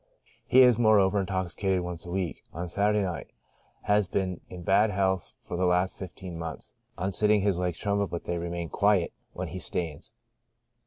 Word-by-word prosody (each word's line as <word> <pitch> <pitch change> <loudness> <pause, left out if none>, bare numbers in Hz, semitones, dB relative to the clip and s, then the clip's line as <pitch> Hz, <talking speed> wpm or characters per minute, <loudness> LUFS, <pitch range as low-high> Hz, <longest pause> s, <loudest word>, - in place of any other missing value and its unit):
He 130 +1 +7
is, 125 -2 +5
moreover, 105 -3 +4
intoxicated 95 0 -1
once 90 -1 -6
a - - -6
week 90 -4 -2
— - - -36
on 85 +2 -4
Saturday 105 +3 +2
night. 90 -3 -4 0.6
Has 105 -1 +3
been 90 -2 -2
in 90 -1 -8
bad 100 +4 +4
health 95 -2 0
for - - -6
the 90 +1 +1
last 90 +1 +2
fifteen 90 -2 -7
months. 80 -3 -6 0.2
On 95 +3 -1
sitting 105 +1 +3
his 95 -3 +1
legs 90 -2 -1
tremble, 100 0 0
but 85 - -5
they 85 0 -2
remain 85 -1 -4
quiet 100 -4 +2 0.2
when - - -4
he 95 - -6
stands. 80 -2 -4
95 Hz, 180 wpm, -28 LUFS, 85-100 Hz, 0.6 s, He